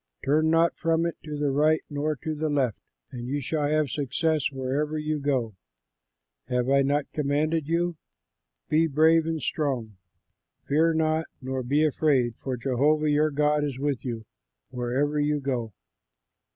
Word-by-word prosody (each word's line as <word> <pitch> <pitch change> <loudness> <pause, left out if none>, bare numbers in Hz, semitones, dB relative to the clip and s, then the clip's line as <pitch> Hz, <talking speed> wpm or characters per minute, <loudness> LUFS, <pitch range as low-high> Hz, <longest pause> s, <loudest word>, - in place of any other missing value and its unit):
Turn 155 +3 +3
not 165 +1 +3
from 165 0 +1
it 170 - -2
to 150 -1 -5
the 145 -1 0
right 155 +3 +3
nor 150 +1 -2
to 155 - -2
the 155 +1 -2
left, 135 -7 0 0.3
and 120 -1 -6
you 140 +3 -1
shall 145 +1 -1
have 155 -4 +1
success 150 +2 0
wherever 140 +3 -2
you 155 0 -2
go. 130 -6 -1 0.9
Have 125 +1 0
I 140 0 +5
not 140 +1 0
commanded 150 +1 0
you? 170 0 0 0.7
Be 160 +2 +3
brave 160 +2 +4
and 160 -4 -2
strong; 125 - -2 0.7
fear 160 +3 +2
not 160 0 +1
nor 130 0 -3
be 140 +5 +1
afraid, 140 -5 +2
for 130 -2 -4
Jehovah 145 +5 +2
your 150 +1 +3
God 150 0 +1
is 140 -3 -3
with 140 -2 -2
you 115 -3 -5 0.5
wherever 130 +4 -1
you 150 0 +1
go." 125 -5 -2
145 Hz, 155 wpm, -26 LUFS, 135-155 Hz, 0.9 s, I